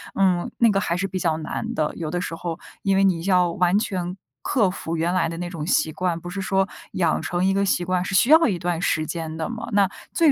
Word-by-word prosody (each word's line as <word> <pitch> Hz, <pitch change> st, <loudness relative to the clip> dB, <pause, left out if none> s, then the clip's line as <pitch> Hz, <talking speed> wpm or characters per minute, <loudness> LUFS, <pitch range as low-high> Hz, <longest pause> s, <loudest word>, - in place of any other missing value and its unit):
嗯， 185 Hz, -3 st, +2 dB
那 230 Hz, -2 st, +5 dB
个 195 Hz, -, +2 dB
还 170 Hz, -4 st, -1 dB
是 185 Hz, +2 st, -1 dB
比 185 Hz, 0 st, -4 dB
较 165 Hz, -3 st, +1 dB
难 155 Hz, -, -4 dB
的。 150 Hz, -1 st, 0 dB
有 160 Hz, -2 st, -3 dB
的 175 Hz, +3 st, -2 dB
时 175 Hz, -, -4 dB
候 165 Hz, 0 st, -4 dB, 0.2 s
因 195 Hz, -1 st, +2 dB
为 195 Hz, -, +4 dB
你 185 Hz, -4 st, +2 dB
要 180 Hz, -3 st, +3 dB
完 180 Hz, +2 st, +2 dB
全 185 Hz, -4 st, -2 dB, 0.3 s
克 215 Hz, -8 st, +2 dB
服 165 Hz, -2 st, -4 dB
原 165 Hz, +2 st, 0 dB
来 185 Hz, -, +2 dB
的 165 Hz, -, -5 dB
那 175 Hz, 0 st, -4 dB
种 165 Hz, -3 st, -5 dB
习 160 Hz, -, +2 dB
惯， 175 Hz, +1 st, -1 dB
不 175 Hz, +1 st, -8 dB
是 195 Hz, +2 st, -4 dB
说 195 Hz, 0 st, +1 dB, 0.3 s
养 170 Hz, -4 st, +1 dB
成 175 Hz, +1 st, -1 dB
一 195 Hz, -, +3 dB
个 200 Hz, +1 st, +1 dB
习 185 Hz, -2 st, +1 dB
惯 180 Hz, 0 st, 0 dB
是 195 Hz, -, -2 dB
需 240 Hz, +8 st, +4 dB
要 320 Hz, +1 st, +7 dB
一 195 Hz, -6 st, 0 dB
段 175 Hz, 0 st, -2 dB
时 155 Hz, -2 st, +1 dB
间 160 Hz, -1 st, -4 dB
的 160 Hz, +6 st, -3 dB
嘛， 230 Hz, 0 st, -5 dB
那 200 Hz, -2 st, +4 dB, 0.2 s
最 325 Hz, -4 st, +5 dB
180 Hz, 280 characters per minute, -23 LUFS, 170-195 Hz, 0.3 s, 要